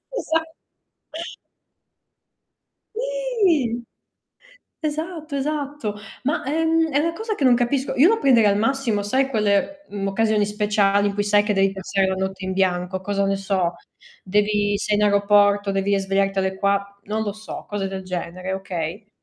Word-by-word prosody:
Esa 325 Hz, -8 st, 0 dB, 2.5 s
Sì. 435 Hz, -, 0 dB, 1.0 s
Esatto, 315 Hz, 0 st, -4 dB
esatto. 285 Hz, -5 st, -3 dB, 0.3 s
Ma 290 Hz, +6 st, 0 dB
è, 305 Hz, +5 st, 0 dB
mhmm, 325 Hz, 0 st, +2 dB
è 285 Hz, -, +2 dB
una 330 Hz, +2 st, 0 dB
cosa 440 Hz, +5 st, -3 dB
che 295 Hz, -, -3 dB
non 255 Hz, -2 st, +6 dB
capisco. 255 Hz, +3 st, 0 dB
Io 280 Hz, +6 st, +6 dB
lo 450 Hz, +1 st, +2 dB
prenderei 235 Hz, -, +5 dB
al 200 Hz, -, +1 dB
massimo, 230 Hz, -2 st, 0 dB
sai 265 Hz, +6 st, +1 dB
quelle, 220 Hz, +6 st, 0 dB
mh, 195 Hz, -1 st, -3 dB
occasioni 215 Hz, +1 st, +2 dB
speciali 205 Hz, -1 st, +2 dB
in 200 Hz, -, -2 dB
cui 205 Hz, +1 st, 0 dB
sai 205 Hz, 0 st, +3 dB
che 210 Hz, 0 st, 0 dB
devi 195 Hz, 0 st, +3 dB
passare 195 Hz, 0 st, -1 dB
la 190 Hz, -, 0 dB
notte 190 Hz, 0 st, -3 dB
in 190 Hz, -, -2 dB
bianco? 185 Hz, 0 st, 0 dB
Cosa 200 Hz, 0 st, 0 dB
ne 195 Hz, 0 st, +1 dB
so? 190 Hz, -3 st, 0 dB, 0.5 s
Devi 205 Hz, +1 st, +1 dB
sei 210 Hz, -, 0 dB
in 210 Hz, -, +2 dB
aeroporto, 205 Hz, 0 st, +3 dB
devi 195 Hz, +1 st, +1 dB
svegliarti 195 Hz, 0 st, 0 dB
alle 190 Hz, 0 st, -1 dB
qua 200 Hz, 0 st, 0 dB
non 215 Hz, +2 st, -2 dB
lo 205 Hz, -2 st, -3 dB
so, 215 Hz, +1 st, -8 dB
cose 205 Hz, -2 st, -2 dB
del 190 Hz, 0 st, -6 dB
genere, 185 Hz, +1 st, -4 dB
okay? 190 Hz, +1 st, -5 dB
205 Hz, 160 wpm, -22 LUFS, 195-275 Hz, 2.5 s, non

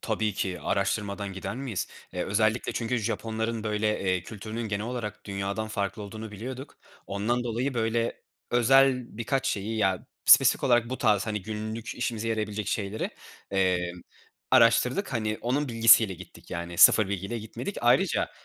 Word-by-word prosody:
Tabii 110 Hz, -1 st, -1 dB
ki 90 Hz, -2 st, -3 dB
araştırmadan 100 Hz, 0 st, -1 dB
gider 95 Hz, +5 st, -5 dB
miyiz? 130 Hz, -8 st, -3 dB, 0.2 s
Eee, 90 Hz, -, -2 dB
özellikle 110 Hz, +3 st, +1 dB
çünkü 120 Hz, +1 st, -1 dB
Japonların 110 Hz, 0 st, -3 dB
böyle, 105 Hz, 0 st, 0 dB
eee, 95 Hz, -2 st, 0 dB
kültürünün 110 Hz, +3 st, -6 dB
genel 105 Hz, +2 st, -2 dB
olarak 110 Hz, -4 st, -5 dB
dünyadan 100 Hz, +2 st, -3 dB
farklı 105 Hz, 0 st, -3 dB
olduğunu 110 Hz, +1 st, -8 dB
biliyorduk. 130 Hz, +7 st, -8 dB, 0.3 s
Ondan 115 Hz, +5 st, -1 dB
dolayı, 125 Hz, +3 st, -2 dB
böyle, 115 Hz, 0 st, -1 dB, 0.3 s
özel 125 Hz, 0 st, +3 dB
birkaç 135 Hz, +4 st, -1 dB
şeyi, 105 Hz, +3 st, -2 dB
ya, 95 Hz, -4 st, 0 dB, 0.2 s
spesifik -, -, +6 dB
olarak 120 Hz, -2 st, +3 dB
bu 130 Hz, -, -3 dB
tarz, 105 Hz, -3 st, +2 dB
hani, 105 Hz, -3 st, -3 dB
günlük 110 Hz, +2 st, -5 dB
işimize 115 Hz, -2 st, -2 dB
yarayabilecek 105 Hz, -2 st, -2 dB
şeyleri, 105 Hz, +1 st, -2 dB, 0.4 s
emm, 90 Hz, -2 st, 0 dB, 0.5 s
araştırdık. 125 Hz, -, +4 dB
Hani, 110 Hz, -2 st, -1 dB
onun 135 Hz, +4 st, -1 dB
bilgisiyle 115 Hz, -3 st, +6 dB
gittik, -, -, -14 dB
yani, 85 Hz, -1 st, -5 dB
sıfır 105 Hz, -3 st, +7 dB
bilgiyle 100 Hz, +4 st, -3 dB
gitmedik. 110 Hz, -, -6 dB
Ayrıca, 125 Hz, +10 st, +2 dB
110 Hz, 145 wpm, -27 LUFS, 100-120 Hz, 0.5 s, sıfır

